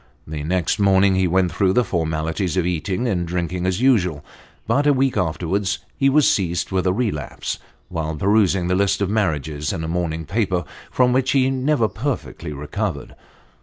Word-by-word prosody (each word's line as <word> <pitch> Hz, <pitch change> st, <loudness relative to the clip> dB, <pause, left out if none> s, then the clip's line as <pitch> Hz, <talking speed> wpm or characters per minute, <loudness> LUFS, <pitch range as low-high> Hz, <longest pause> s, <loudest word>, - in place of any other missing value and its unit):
The 75 Hz, -1 st, -5 dB
next 90 Hz, +4 st, 0 dB
morning 95 Hz, -1 st, +4 dB
he 95 Hz, -1 st, +2 dB
went 90 Hz, 0 st, +2 dB
through 95 Hz, -2 st, +2 dB
the 125 Hz, -, +3 dB
formalities 80 Hz, 0 st, -2 dB
of 90 Hz, -, +2 dB
eating 90 Hz, +7 st, -1 dB
and 90 Hz, -6 st, -1 dB
drinking 90 Hz, +1 st, -2 dB
as 95 Hz, +4 st, -1 dB
usual, 90 Hz, -, +2 dB, 0.4 s
but 145 Hz, +2 st, +2 dB
a 145 Hz, -, +6 dB
week 135 Hz, -1 st, +1 dB
afterwards 90 Hz, +4 st, -1 dB, 0.2 s
he 135 Hz, 0 st, +3 dB
was 145 Hz, +1 st, +4 dB
seized 90 Hz, -2 st, 0 dB
with 95 Hz, 0 st, 0 dB
a -, -, +4 dB
relapse, 100 Hz, -8 st, -3 dB, 0.3 s
while 80 Hz, -1 st, -3 dB
perusing 95 Hz, +1 st, +2 dB
the 90 Hz, -, +1 dB
list 100 Hz, +1 st, +1 dB
of 100 Hz, -, -1 dB
marriages 75 Hz, -8 st, -1 dB
in 80 Hz, -, -4 dB
a -, -, -3 dB
morning 80 Hz, -1 st, -2 dB
paper, 95 Hz, 0 st, 0 dB, 0.3 s
from 125 Hz, -1 st, +2 dB
which 130 Hz, +1 st, +2 dB
he 135 Hz, -1 st, +3 dB
never 130 Hz, -2 st, +1 dB
perfectly 120 Hz, -, -4 dB
recovered. 75 Hz, 0 st, -4 dB
95 Hz, 175 wpm, -21 LUFS, 85-110 Hz, 0.4 s, a